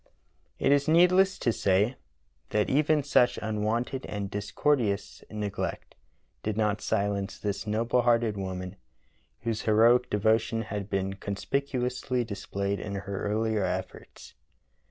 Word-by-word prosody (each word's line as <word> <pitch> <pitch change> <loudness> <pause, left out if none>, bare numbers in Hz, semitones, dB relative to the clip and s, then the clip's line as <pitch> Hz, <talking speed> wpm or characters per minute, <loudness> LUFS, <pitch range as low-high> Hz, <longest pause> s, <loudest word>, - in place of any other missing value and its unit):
It - - +2
is 145 +1 +3
needless 180 +4 +5
to 115 - 0
say 100 +6 +2 0.5
that 105 -1 +1
even 150 +1 +3
such 125 -3 +3
unwonted 110 +5 -2
and 100 -1 -4
discourteous 105 +1 -1
neglect 105 -2 -4 0.5
did 110 -1 -3
not 105 -1 +1
silence 100 -2 -1
this 105 +1 -3
noble 115 +3 +1
hearted 115 -2 +2
woman, 95 -1 -5 0.6
whose 115 -2 -2
heroic 115 +3 +4
devotion 110 +2 +1
had 105 -2 -5
been 95 -1 -1
conspicuously 125 +5 -2
displayed 100 -1 -3
in 100 -1 -5
her 100 0 -4
earlier 110 0 0
efforts. 90 - -5
110 Hz, 120 wpm, -28 LUFS, 100-125 Hz, 0.6 s, needless